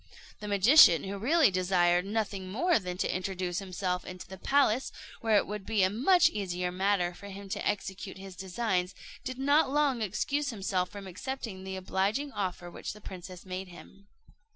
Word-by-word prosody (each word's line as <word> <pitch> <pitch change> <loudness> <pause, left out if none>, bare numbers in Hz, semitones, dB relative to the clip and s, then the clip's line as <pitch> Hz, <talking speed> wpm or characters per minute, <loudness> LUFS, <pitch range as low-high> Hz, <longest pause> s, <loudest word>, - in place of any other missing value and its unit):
The 210 - -7
magician, 200 - +7
who 200 +1 -5
really 290 +2 +4
desired 180 -1 +2
nothing 200 -3 -3
more 335 - +2
than 180 -2 -5
to - - -1
introduce 185 -1 -2
himself 185 -1 -3
into 185 0 -9
the 190 0 -10
palace, 265 -2 +2 0.3
where 220 -2 +3
it - - +2
would 210 -1 -5
be 210 -1 +1
a 185 - +3
much 320 - +5
easier 180 -3 -2
matter 185 -1 +1
for 200 - -11
him 200 0 -9
to - - -2
execute 190 -1 -3
his 190 -1 -10
designs, 185 0 -2 0.3
did 255 0 -5
not 285 +2 +3
long 280 -4 +1
excuse 280 +8 -1
himself 190 -5 -1
from 200 -1 -9
accepting 190 +1 -6
the 190 0 -5
obliging 195 +9 -1
offer 180 -5 -4
which - - -6
the 210 - -14
princess 185 -1 -9
made 185 +1 -5
him. 180 +3 -15
195 Hz, 175 wpm, -30 LUFS, 185-225 Hz, 0.3 s, magician